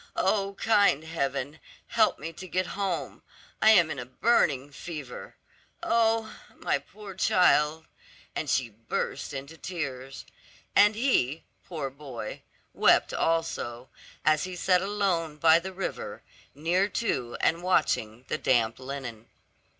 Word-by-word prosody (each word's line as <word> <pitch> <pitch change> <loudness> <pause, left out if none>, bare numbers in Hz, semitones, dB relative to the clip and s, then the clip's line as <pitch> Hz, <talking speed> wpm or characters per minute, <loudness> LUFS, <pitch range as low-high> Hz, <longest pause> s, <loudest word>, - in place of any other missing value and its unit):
O 200 -1 +1
kind 200 -9 +3
Heaven, 140 -2 -3 0.3
help - - +3
me 165 +3 -6
to 185 +3 -9
get 185 +1 0
home; 195 -3 -3 0.4
I 220 - +7
am 175 -7 +6
in - - -4
a 125 - -5
burning 140 - +2
fever. 145 -3 -8 0.5
Oh, 225 -1 +2 0.2
my - - 0
poor 210 -2 -11
child," 160 -4 +3 0.5
and 155 - -3
she 130 -3 +1
burst 115 +6 -4
into 140 +3 -7
tears. 135 -7 -5 0.5
And 210 +1 +6
he, 165 - +1 0.2
poor 150 -6 -4
boy, 130 -6 -7 0.3
wept - - +4
also, 130 -7 -1 0.4
as 155 0 +3
he 185 -1 -6
sat 180 +1 +3
alone 190 -6 -1
by 160 +1 +6
the 190 +2 -6
river, 190 0 -5 0.3
near 175 +7 +1
to 125 - -2
and 165 +1 +2
watching 125 -10 0
the - - -2
damp 115 -2 +2
linen. 130 -4 -7
160 Hz, 130 wpm, -28 LUFS, 135-190 Hz, 0.5 s, I